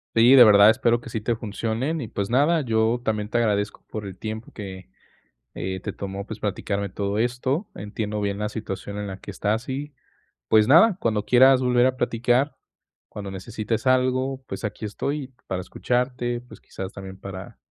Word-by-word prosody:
Sí, 115 +3 +7
de 130 - +10
verdad, 105 -1 +8
espero 120 0 +2
que 125 - -10
sí 110 - -3
te 115 +1 0
funcionen 115 +8 -2
y, 115 - -5
pues, 100 +1 -3
nada, 150 +6 +3
yo 115 -1 +1
también 105 -1 -1
te 120 - 0
agradezco 105 -3 0
por 105 -2 -6
el 95 - -9
tiempo 110 +1 -6
que, 95 -3 -9 0.7
eh, 95 +2 -4
te 105 - -4
tomó, 100 0 -6
pues, - - -7
platicarme 100 0 -2
todo 100 +2 -2
esto. 130 - -1
Entiendo 105 +1 -4
bien 100 0 -1
la 105 0 -1
situación 100 -2 -6
en 105 0 -4
la 95 - -6
que - - -11
estás 105 +4 -1
y, 140 +2 -4 0.6
pues 110 -1 +5
nada, 175 - +6
cuando 105 -2 0
quieras 130 +1 +6
volver 125 0 +3
a 130 0 +2
platicar, 120 +4 +1 0.5
cuando 100 -2 -7
necesites 110 +4 -3
algo, 130 +1 +1
pues, - - -5
aquí 105 - -5
estoy 135 +5 -3
para 95 -1 -2
escucharte, 120 +3 -1
pues, 125 - -15
quizás 95 0 -7
también 95 -1 -9
para 95 -1 -9
110 Hz, 185 wpm, -24 LUFS, 100-125 Hz, 0.7 s, de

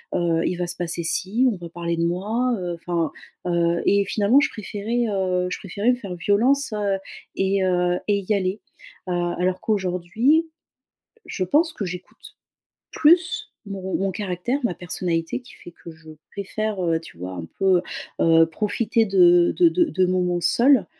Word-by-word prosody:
heu, 170 -1 +1
il 180 - -1
va 175 -1 -2
se 175 - -2
passer 170 -1 -2
ci, 205 +9 0
on 215 - -2
va 170 -2 -9
parler 170 0 -3
de 165 - -1
moi», 215 +9 0
heu, 175 -1 -3
enfin, 170 -1 -2 0.4
heu. 170 -1 +1
Et 200 0 +4
finalement, 215 +7 +3
je - - +1
préférais, 220 +3 -3
heu, 185 -2 0
je - - -3
préférais 200 +5 0
me - - +1
faire 200 -7 -7
violence 230 - +2
heu 205 -2 0 0.4
et 195 0 +1
heu 180 -1 +1
et 200 - +3
y 215 - +2
aller. 195 +1 -1 0.5
Heu, - - 0 0.3
alors 185 0 0
qu'aujourd'hui, 210 - +1 0.8
je 185 - -3
pense 315 - +2
que 205 - -4
j'écoute 180 0 -9 0.6
plus 340 +3 +3
mon 190 -1 -4
mon 195 0 0
caractère, 205 +7 -2
ma 200 -7 0
personnalité, 175 +3 -2
qui 250 - -16
fait 175 - -13
que 170 - -13
je 160 0 -16 0.2
préfère, 205 0 -3
heu, 165 -1 +1
tu 160 - -14
vois, 90 +1 -6
un 85 -2 -6
peu, 190 -2 +4 0.4
heu, 165 0 +6
profiter 220 +5 0
de 175 -3 +5
de 345 -2 +6
de 345 0 +2
de 185 - +1
moments 180 -1 0
seule, 265 +7 +4
185 Hz, 175 wpm, -23 LUFS, 175-215 Hz, 0.8 s, heu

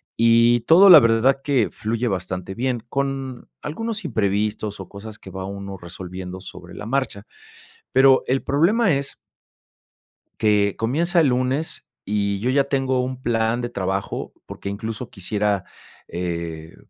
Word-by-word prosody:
y 115 +1 +4
todo 170 - +7
la 165 - +12
verdad 115 +4 +3
que 135 -7 +2
fluye 115 +3 -2
bastante 90 -2 -3
bien, 125 -1 -1
con 135 -2 -3
algunos 215 +6 -4
imprevistos 105 -3 -1
o - - -7
cosas 105 +2 -10
que - - -11
va 95 0 -5
uno 100 0 -6
resolviendo 90 +1 -8
sobre 95 - -11
la - - -7
marcha, 115 -4 -2 0.7
pero 130 0 +6
el 130 +1 +1
problema 180 +7 +3
es 140 0 -4 1.2
que 105 -2 +2
comienza 165 +10 +1
el 155 - +4
lunes 130 +5 -1 0.2
y 100 -1 -1
yo 120 +5 -1
ya 135 +1 +3
tengo 135 -2 0
un 130 0 -5
plan 115 0 0
de 120 - -3
trabajo 95 -3 -3
porque 100 - -7
incluso 110 +4 -5
quisiera, 105 -2 -1 0.4
eh, 85 -2 -5
115 Hz, 140 wpm, -22 LUFS, 100-135 Hz, 1.2 s, la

